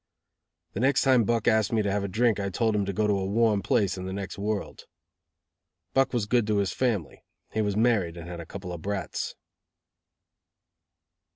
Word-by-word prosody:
The -, -, -4 dB
next 135 Hz, +2 st, +3 dB
time 130 Hz, -4 st, +4 dB
Buck 115 Hz, 0 st, 0 dB
asked 110 Hz, -2 st, +3 dB
me 110 Hz, -2 st, +2 dB
to 100 Hz, -, 0 dB
have 100 Hz, 0 st, 0 dB
a -, -, -1 dB
drink 110 Hz, +3 st, +2 dB
I 100 Hz, 0 st, -1 dB
told 110 Hz, +4 st, +1 dB
him 100 Hz, -1 st, +1 dB
to -, -, 0 dB
go 105 Hz, +2 st, 0 dB
to 105 Hz, -, +2 dB
a 95 Hz, -1 st, -1 dB
warm 110 Hz, 0 st, +2 dB
place 95 Hz, -1 st, +1 dB
in 90 Hz, -, -5 dB
the 95 Hz, -, -4 dB
next 95 Hz, -3 st, -5 dB
world. 105 Hz, 0 st, -3 dB, 1.1 s
Buck 135 Hz, 0 st, +3 dB
was 120 Hz, -4 st, 0 dB
good 120 Hz, 0 st, +2 dB
to 105 Hz, -1 st, +1 dB
his 100 Hz, -3 st, 0 dB
family. 110 Hz, -, -1 dB, 0.3 s
He 110 Hz, -, +1 dB
was 105 Hz, -1 st, -1 dB
married 105 Hz, -8 st, +2 dB
and 85 Hz, 0 st, -8 dB
had 85 Hz, -1 st, -7 dB
a 85 Hz, -, -7 dB
couple 90 Hz, -2 st, -7 dB
of 85 Hz, -, -7 dB
brats. 100 Hz, +2 st, -3 dB
105 Hz, 200 wpm, -27 LUFS, 95-115 Hz, 1.1 s, time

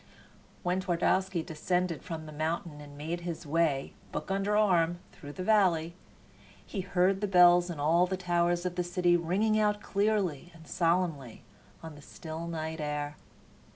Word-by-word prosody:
When 180 Hz, +1 st, 0 dB
Twardowski 185 Hz, 0 st, 0 dB
descended 175 Hz, +1 st, -1 dB
from 160 Hz, -2 st, -6 dB
the 155 Hz, -, -9 dB
mountain 155 Hz, 0 st, -3 dB
and 145 Hz, -1 st, -12 dB
made 165 Hz, +4 st, -4 dB
his 170 Hz, -1 st, -5 dB
way, 150 Hz, -3 st, 0 dB, 0.2 s
book -, -, -4 dB
under 200 Hz, +2 st, +1 dB
arm, 175 Hz, -5 st, +3 dB
through 145 Hz, 0 st, -11 dB
the 185 Hz, -, -5 dB
valley, 180 Hz, -6 st, +3 dB, 0.7 s
he 195 Hz, -, -4 dB
heard 185 Hz, +1 st, +1 dB
the 205 Hz, -, 0 dB
bells 180 Hz, -1 st, +6 dB
in 165 Hz, -4 st, -5 dB
all 165 Hz, +5 st, +3 dB
the 190 Hz, +1 st, -2 dB
towers 175 Hz, -1 st, 0 dB
of 180 Hz, 0 st, -3 dB
the 180 Hz, -, +1 dB
city 175 Hz, 0 st, +2 dB
ringing 195 Hz, +6 st, +1 dB
out 210 Hz, -1 st, +2 dB
clearly 195 Hz, -6 st, 0 dB
and 160 Hz, -1 st, -15 dB
solemnly 165 Hz, -8 st, -1 dB, 0.4 s
on 160 Hz, -1 st, -8 dB
the 145 Hz, -, -13 dB
still 160 Hz, +3 st, -7 dB
night 160 Hz, -1 st, -4 dB
air. 150 Hz, 0 st, -3 dB
175 Hz, 160 wpm, -30 LUFS, 160-185 Hz, 0.7 s, bells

